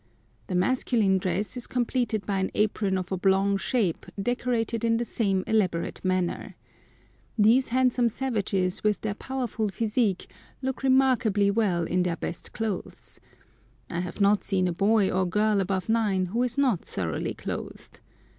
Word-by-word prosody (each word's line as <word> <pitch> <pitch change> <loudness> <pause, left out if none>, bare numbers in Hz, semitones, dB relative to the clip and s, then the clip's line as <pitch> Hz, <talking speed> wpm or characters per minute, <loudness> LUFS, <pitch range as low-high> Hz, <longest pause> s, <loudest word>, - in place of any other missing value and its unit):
The 185 - -3
masculine 200 -1 +2
dress 190 +6 -2
is 245 - -5
completed 240 -3 -1
by 195 -2 -1
an 190 - 0
apron 210 -2 +1
of 185 +1 -4
oblong 195 +1 +2
shape 195 -5 -1
decorated 230 0 -1
in 230 0 +2
the 240 - -1
same 195 -5 0
elaborate 185 -6 0
manner. 185 -2 -1 0.8
These 230 +5 +4
handsome 250 -1 +2
savages, 200 -7 -1
with 210 -1 +2
their 215 -2 -2
powerful 240 -2 -3
physique, 210 -1 0 0.3
look 265 -1 -3
remarkably 255 -7 +3
well 200 -6 +1
in 180 +2 0
their 175 -1 -1
best 170 - -5
clothes. 220 -4 -5 0.7
I 170 - -2
have 180 +3 -5
not 200 0 +3
seen 185 -2 +1
a 175 - -1
boy 200 +2 +2
or 185 0 +1
girl 210 +2 +2
above 190 -1 -2
nine 210 -5 +1
who 235 - +1
is 250 0 0
not 255 -11 +2
thoroughly 85 -4 -3
clothed. - - -7
210 Hz, 150 wpm, -26 LUFS, 190-235 Hz, 0.8 s, These